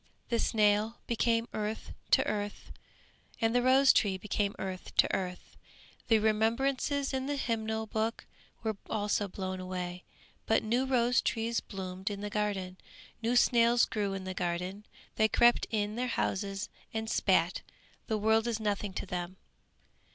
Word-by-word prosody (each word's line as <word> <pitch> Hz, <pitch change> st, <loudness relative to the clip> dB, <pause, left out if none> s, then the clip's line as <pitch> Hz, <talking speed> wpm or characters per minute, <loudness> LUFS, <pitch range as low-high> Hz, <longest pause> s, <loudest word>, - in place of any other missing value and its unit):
The 235 Hz, -, +1 dB
snail 215 Hz, +1 st, +2 dB
became 230 Hz, 0 st, +1 dB
earth 215 Hz, +1 st, -4 dB, 0.2 s
to -, -, +5 dB
earth 205 Hz, -1 st, -4 dB, 0.7 s
and 225 Hz, 0 st, +2 dB
the 245 Hz, -, +3 dB
rose 265 Hz, +2 st, +6 dB
tree 195 Hz, -4 st, +2 dB
became 200 Hz, +1 st, -1 dB
earth 190 Hz, -1 st, -6 dB
to -, -, +4 dB
earth; 180 Hz, -1 st, -5 dB, 0.5 s
the 225 Hz, -, +5 dB
remembrances 255 Hz, +6 st, +1 dB
in 265 Hz, 0 st, -1 dB
the 290 Hz, -, -1 dB
hymn 230 Hz, -5 st, -1 dB
book 220 Hz, +1 st, -2 dB, 0.4 s
were 220 Hz, -2 st, -1 dB
also 205 Hz, -1 st, 0 dB
blown 185 Hz, 0 st, -4 dB
away 180 Hz, -1 st, -5 dB, 0.4 s
but 225 Hz, -, +3 dB
new 240 Hz, +4 st, +1 dB
rose 250 Hz, -1 st, +3 dB
trees 230 Hz, 0 st, 0 dB
bloomed 190 Hz, -1 st, -5 dB
in 200 Hz, -1 st, -5 dB
the 205 Hz, 0 st, -4 dB
garden, 200 Hz, -3 st, -2 dB, 0.4 s
new 235 Hz, +2 st, +1 dB
snails 235 Hz, -1 st, +5 dB
grew 205 Hz, -3 st, -2 dB
in 190 Hz, -, -5 dB
the 185 Hz, 0 st, -4 dB
garden; 180 Hz, +3 st, -3 dB, 0.3 s
they 220 Hz, -, +5 dB
crept 240 Hz, +2 st, +4 dB
in 210 Hz, -1 st, -1 dB
their 250 Hz, +1 st, 0 dB
houses 195 Hz, -3 st, -2 dB, 0.2 s
and 220 Hz, 0 st, -3 dB
spat. -, -, +2 dB, 0.5 s
The 220 Hz, -, 0 dB
world 220 Hz, +2 st, +2 dB
is 230 Hz, -2 st, -1 dB
nothing 205 Hz, -2 st, -2 dB
to -, -, -4 dB
them. 180 Hz, 0 st, -5 dB
215 Hz, 150 wpm, -31 LUFS, 195-230 Hz, 0.7 s, rose